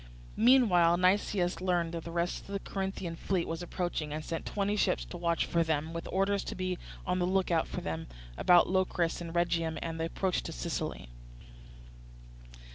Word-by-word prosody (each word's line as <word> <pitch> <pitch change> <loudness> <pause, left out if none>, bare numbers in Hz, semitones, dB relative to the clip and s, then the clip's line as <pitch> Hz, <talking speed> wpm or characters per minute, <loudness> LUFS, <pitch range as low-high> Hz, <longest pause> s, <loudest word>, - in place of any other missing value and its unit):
Meanwhile 200 -9 +6
Nicias 185 0 +2
learned 175 -3 +1
that 165 -1 -4
the - - -5
rest 170 +1 -1
of - - -17
the 200 - -1
Corinthian 190 -4 -4
fleet 180 +1 -1
was 165 +1 -3
approaching, 175 -3 -3
and 155 +1 -4
sent 165 - -4
twenty 205 0 0
ships - - +1
to - - -9
watch 170 -1 0
for 170 -1 +2
them, 160 0 -1
with 170 0 -5
orders 195 +1 +1
to - - -4
be 185 -1 -2 0.3
on 180 0 0
the 180 - +1
look 190 -1 +1
out 165 -1 +2
for - - -5
them 80 0 -4 0.3
about 175 - +5
Locris 180 -3 0
and 170 -1 -5
Rhegium 165 -2 +1
and 165 -1 -4
the 165 - 0
approach 185 +2 -1
to - - -6
Sicily. - - -4
175 Hz, 185 wpm, -31 LUFS, 165-185 Hz, 0.3 s, Meanwhile